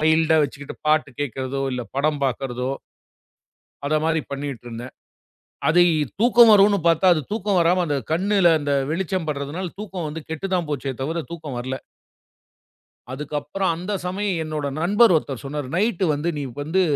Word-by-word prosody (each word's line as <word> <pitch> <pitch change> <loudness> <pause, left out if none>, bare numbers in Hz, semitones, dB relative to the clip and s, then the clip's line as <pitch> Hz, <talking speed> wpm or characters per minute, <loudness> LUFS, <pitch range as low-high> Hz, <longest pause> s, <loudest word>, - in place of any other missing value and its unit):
மைல்ட்டா 160 +1 +4
வச்சுக்கிட்டு 140 0 -5
பாட்டு 155 -2 +2
கேக்கறதோ 135 0 -3
இல்ல 125 -1 -2
படம் 150 +1 +1
பாக்கறதோ 130 -1 -2 1.2
அத 150 - +1
மாரி 160 -1 +2
பண்ணிட்டு 140 -3 -5
இருந்தேன். 120 +2 -7 0.8
அதைத் 160 -4 +3
தூக்கம் 235 -1 +7
வரும்னு 200 0 +6
பாத்தா 170 +3 +4
அது 155 - -1
தூக்கம் 205 -3 +1
வராம 175 +2 +3
அந்த 145 -2 0
கண்ணுல 190 +2 +3
அந்த 145 -1 -1 0.2
வெளிச்சம் 185 0 -1
படுறதுனால 150 +5 -3
தூக்கம் 190 -6 -5
வந்து 160 +2 -6
கெட்டுதான் 175 0 -2
போச்சு 140 -1 -2
தவிர 165 +4 -2
தூக்கம் 155 -6 -6
வரல. 130 +2 -3 1.4
அதுக்கப்புறம் 150 +6 -2
அந்தச் 185 +2 -4
சமயம் 190 -1 -1
என்னோட 155 -2 -3
நண்பர் 205 +5 +5
ஒருத்தர் 140 -4 -4
சொன்னாரு. 140 -1 -4
நைட்டு 200 -1 +1
வந்து 145 +4 -2
நீ - - -3 0.2
வந்து 165 +6 +1
160 Hz, 145 wpm, -23 LUFS, 145-185 Hz, 1.4 s, தூக்கம்